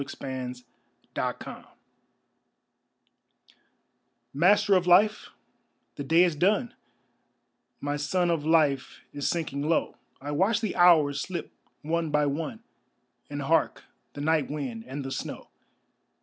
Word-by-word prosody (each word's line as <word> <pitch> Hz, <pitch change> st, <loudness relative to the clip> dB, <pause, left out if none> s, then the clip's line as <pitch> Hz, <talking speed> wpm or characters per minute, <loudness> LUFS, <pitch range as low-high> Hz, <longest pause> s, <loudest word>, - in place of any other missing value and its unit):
The 130 Hz, -2 st, -5 dB, 0.6 s
Last -, -, -1 dB
Prayer -, -, -9 dB, 2.7 s
Master 200 Hz, +7 st, +4 dB
of 180 Hz, -1 st, +2 dB
life, 210 Hz, +5 st, +4 dB, 0.7 s
the 140 Hz, -, -5 dB
day 165 Hz, +5 st, +4 dB
is 175 Hz, -3 st, +1 dB
done; 210 Hz, -, +1 dB, 1.1 s
My 145 Hz, +1 st, -2 dB
sun 175 Hz, +4 st, 0 dB
of 165 Hz, -3 st, -1 dB
life 150 Hz, -4 st, +1 dB
is 145 Hz, -, -2 dB
sinking 155 Hz, -5 st, -2 dB
low; 160 Hz, +3 st, 0 dB, 0.2 s
I 145 Hz, +2 st, -6 dB
watch 195 Hz, +9 st, +2 dB
the 220 Hz, -4 st, -3 dB
hours 155 Hz, -6 st, +5 dB
slip 175 Hz, -4 st, -5 dB, 0.3 s
one 165 Hz, +1 st, -1 dB
by 150 Hz, 0 st, +2 dB
one 160 Hz, +10 st, -4 dB, 0.7 s
And -, -, -4 dB
hark -, -, +1 dB, 0.3 s
the 145 Hz, -, -7 dB
night 155 Hz, -1 st, +1 dB
wind 130 Hz, -7 st, -5 dB
and 135 Hz, +1 st, -6 dB
the 135 Hz, -, -5 dB
snow. -, -, -6 dB
155 Hz, 120 wpm, -27 LUFS, 145-180 Hz, 2.7 s, hours